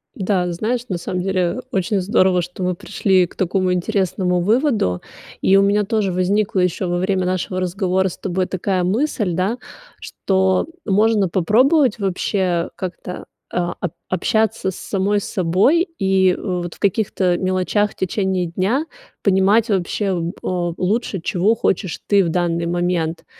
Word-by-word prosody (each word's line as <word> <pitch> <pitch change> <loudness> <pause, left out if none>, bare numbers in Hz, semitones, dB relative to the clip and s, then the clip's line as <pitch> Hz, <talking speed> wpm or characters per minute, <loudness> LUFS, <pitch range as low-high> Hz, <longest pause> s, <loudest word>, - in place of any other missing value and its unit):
Да, 185 -3 0
знаешь, 220 +8 -1
на 185 - -1
самом 180 +1 -3
деле, 190 0 -1
э, 175 +7 -1
очень 195 -2 0
здорово, 185 -1 +3
что 180 +2 -6
мы 180 0 0
пришли 185 +1 +1
к - - -19
такому 185 0 0
интересному 180 -1 0
выводу. 215 - +1 0.4
И 190 - +4
у - - +6
меня 200 +1 +3
тоже 210 -2 0
возникла 190 +2 +1
ещё 180 0 0
во 175 - 0
время 185 0 0
нашего 185 0 -2
разговора 185 +1 0
с 180 - -6
тобой 185 -1 -2
такая 185 0 -1
мысль, 210 - 0
да, 190 +7 0 0.4
что 190 +2 0 0.2
можно 210 -1 +2
попробовать 240 - +3
вообще 185 -2 0
как-то, 180 -1 -6 0.3
а, 175 -1 -1
ап 180 - -3 0.2
общаться 220 0 0
с - - -11
самой 200 +1 0
собой 195 - +2
и, 190 -1 +3
вот, 180 -3 -3
в - - -22
каких-то 190 -3 +1
мелочах 185 +3 0
в - - -18
течение 190 -1 -1
дня 195 - 0 0.4
понимать 200 +3 +3
вообще 195 0 0
б 170 0 -2
э, - - -10 0.3
лучше, 200 +1 -1
чего 185 +6 +1
хочешь 190 -4 -1
ты 200 -1 +4
в 170 - -1
данный 170 0 0
момент. 175 -1 -1
190 Hz, 155 wpm, -20 LUFS, 180-205 Hz, 0.4 s, у